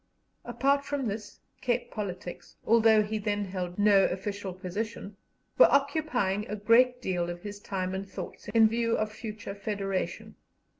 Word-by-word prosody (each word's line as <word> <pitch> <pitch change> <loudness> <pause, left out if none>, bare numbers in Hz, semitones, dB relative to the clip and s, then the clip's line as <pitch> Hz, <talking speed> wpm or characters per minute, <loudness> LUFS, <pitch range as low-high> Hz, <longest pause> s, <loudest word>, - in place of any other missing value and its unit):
Apart 275 +4 +1
from 280 -3 -2
this, 210 0 -6 0.2
Cape 245 -1 -1
politics, 185 -4 -6
although 225 -1 +5
he 215 +1 -3
then 205 -1 -1
held 180 -2 -5
no 205 -2 +5
official 200 +1 -3
position, 200 +3 -5 0.4
were - - +8
occupying 275 -8 +1
a 210 - -3
great 240 +4 +4
deal 175 -2 -1
of 175 0 -7
his 205 -1 -7
time 185 -2 -3
and 195 +1 -4
thoughts - - -8
in 225 -1 +5
view 230 +1 0
of 215 0 -1
future 215 -2 -7
Federation. 200 -2 -3
210 Hz, 150 wpm, -29 LUFS, 195-230 Hz, 0.4 s, were